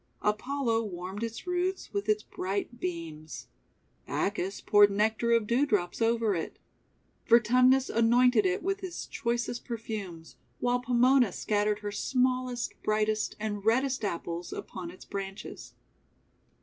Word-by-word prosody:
Apollo 230 +2 0
warmed 185 +1 -6
its 230 0 -5
roots 360 +1 -2
with 200 +1 -2
his 215 0 +2
bright 200 +5 -4
beams. 165 -4 -6 0.6
Bacchus 195 -1 -2
poured 205 0 +6
nectar 220 +3 +1
of 230 -2 +3
dew 235 +6 +2
drops 205 -8 0
over 225 -2 +2
it. 165 -3 -4 0.7
Vertumnus 250 +3 +5
anointed 235 0 +4
it 185 +5 0
with 390 +2 -1
his 370 -3 -6
choicest 235 -1 -2
perfumes, 205 -8 -6 0.2
while 245 0 +1
Pomona 250 -1 +4
scattered 210 +2 0
her 205 0 -4
smallest, 250 +2 0
brightest, 215 0 0
and 210 -2 -3
reddest 255 +3 +1
Apples 170 -2 -3
upon 180 -2 -6
its 185 - -12
branches. 195 0 -7
220 Hz, 125 wpm, -29 LUFS, 200-245 Hz, 0.7 s, poured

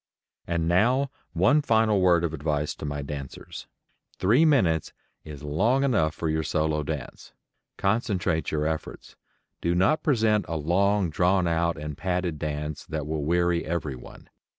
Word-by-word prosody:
And 85 -1 -1
now 125 +10 +2 0.2
one 150 +1 +4
final 110 -6 +2
word 90 -2 +4
of 80 -2 -1
advice 75 -1 -1
to - - -8
my 70 0 -3
dancers: 70 -1 -8 0.5
Three 120 - +4
minutes 90 - +2 0.3
is 75 -2 -10
long 110 - +1
enough 100 - +1
for 80 - -3
your 80 0 0
solo 80 -1 0
dance. 75 -2 -6 0.4
Concentrate 95 -5 0
your 75 -1 -1
efforts. 80 0 -5 0.5
Do 85 +1 +1
not 95 - +3
present 110 -7 +2
a 80 0 -2
long 95 +4 +1
drawn 90 +3 +2
out 85 0 0
and 75 -1 -6
padded 90 -3 -2
dance 75 0 -4
that 75 -2 -4
will 75 -1 -3
weary 85 +2 +1
everyone. 75 -6 -5
85 Hz, 150 wpm, -26 LUFS, 75-100 Hz, 0.5 s, one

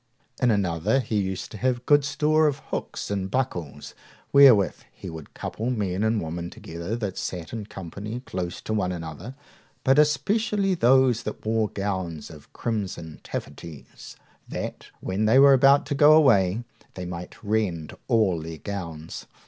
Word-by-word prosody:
In 125 - +4
another, 100 +2 +1
he 115 -4 -2
used 95 -1 -4
to 110 - -8
have 125 0 0
good 145 -1 +5
store 155 +2 +2
of 145 -2 0
hooks - - -4
and 95 -2 -2
buckles, 90 - -3 0.4
wherewith 130 -9 +7
he 90 - -9
would 80 -2 -10
couple 115 +3 -4
men 100 -5 -1
and 110 0 +2
women 85 0 -4
together 85 +7 -6
that 105 -5 -4
sat 90 +1 -5
in 110 -3 -5
company 105 +5 -7
close 90 -8 -5
to 110 - -4
one 95 -4 0
another, 85 - -7 0.5
but 135 +2 +4
especially 195 +6 +2
those 130 -5 +4
that - - -7
wore 110 -1 +1
gowns 95 -6 -4
of 75 -3 -14
crimson 100 -8 -4
taffeties, 70 +1 -8 0.3
that, - - -5
when 100 +3 -1
they 110 +4 +5
were 140 0 +8
about 135 +2 +5
to - - -2
go 145 +2 +6
away, 115 -9 +4 0.3
they 90 - -5
might 90 0 -7
rend 100 -7 -1
all 105 -9 +2
their 80 0 -7
gowns. 85 -5 -7
105 Hz, 155 wpm, -25 LUFS, 90-130 Hz, 0.5 s, were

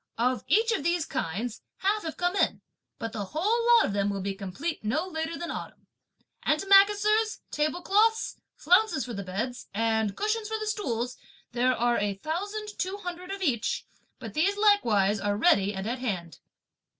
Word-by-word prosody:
Of 250 +2 +1
each 455 +3 +3
of 460 - 0
these 340 0 +1
kinds, 215 - -3 0.2
half 410 +3 +1
have 320 -4 -6
come 355 +1 0
in, - - +1 0.4
but 225 0 -5
the 210 -3 -3
whole 425 - 0
lot - - +4
of - - -2
them 200 0 +1
will 200 -1 -2
be 195 0 -2
complete 200 - -5
no 265 +11 0
later 320 -1 -3
than 345 - -4
autumn. - - -8 0.6
Antimacassars, 410 +5 +4
table 310 +4 -1
cloths, 445 +4 +2 0.2
flounces 350 - +3
for 240 - -6
the 200 - -4
beds, 220 +7 -4
and 220 -2 0
cushions 430 +1 -1
for 440 +1 -2
the 430 - -4
stools, 250 - -2 0.3
there 250 +1 +1
are 240 +1 +2
a 205 -1 -1
thousand 405 - -4
two 380 +2 -2
hundred 355 +1 -6
of 390 0 -4
each, 245 -9 0 0.3
but - - -8
these 385 +7 +1
likewise 225 - +3
are 205 0 -1
ready 205 - +4
and 190 -1 -5
at 245 +2 -2
hand." 175 - -4
310 Hz, 175 wpm, -28 LUFS, -, 0.6 s, lot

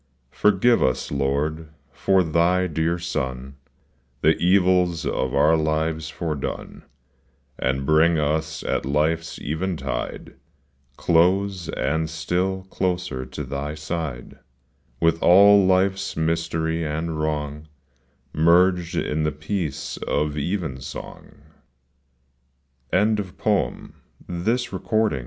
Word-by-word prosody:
Forgive 105 +6 +3
us, 65 - 0
Lord, 70 +3 -1 0.2
for 95 -1 +2
Thy 85 +3 +2
dear 80 0 0
Son 65 -6 -4 0.7
The 80 +1 +4
evils 90 -2 +2
of 65 +1 -1
our 75 +3 +5
lives 80 0 -1
foredone, 75 -4 -5 0.8
And 65 +1 -1
bring 80 +3 +4
us 80 +1 -1
at - - -1
life's 80 +4 0
eventide 80 -4 -3 0.6
Close, 90 +2 +2
and 80 +4 -1
still 90 +4 -1
closer 90 -8 -2
to 70 +3 -6
Thy 70 +3 -4
side, 80 -5 -5 0.6
With 85 0 +2
all 100 +2 +7
life's 95 0 +1
mystery 80 0 -1
and 80 +1 -3
wrong 75 0 -3 0.7
Merged 85 +2 +3
in 75 +1 -1
the 75 0 +1
peace 75 -1 -4
of 75 0 -1
even 75 -4 -3
song. - - -10
80 Hz, 95 wpm, -23 LUFS, 75-90 Hz, 0.8 s, all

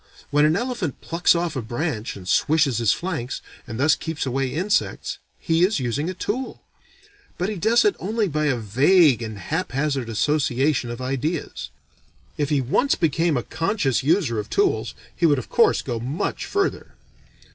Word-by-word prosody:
When 150 +1 +4
an 155 +1 +3
elephant 230 - -3
plucks 170 +1 +2
off 170 -1 -1
a 130 - -2
branch 120 0 -3
and 90 -2 -10
swishes 145 - +2
his 115 -3 +3
flanks, 155 -5 -3 0.3
and 115 -1 -6
thus 150 +3 +4
keeps 160 -3 -3
away 135 +1 -1
insects, 185 +10 -1 0.2
he 165 0 +1
is 190 -2 +2
using 130 +6 -1
a 185 - -5
tool. 250 +8 -4 0.7
But 180 +3 -1
he 215 - -3
does 225 - +3
it 415 - +3
only 215 +2 0
by 155 -2 -1
a 135 -4 +1
vague 130 - +4
and 110 -2 -5
haphazard 140 - -2
association 135 +1 +1
of 120 +1 -6
ideas. 135 +5 -3 0.7
If 145 -2 -1
he 145 -3 +2
once 200 - +2
became 165 -1 +1
a 120 - -2
conscious 165 - 0
user 145 - +1
of 105 - -5
tools 400 -1 0 0.2
he 170 - +3
would 145 -2 +3
of 130 - -6
course - - +3
go 120 -3 -3
much 130 +8 -3
further. 395 -1 -2
150 Hz, 170 wpm, -23 LUFS, 125-175 Hz, 0.7 s, When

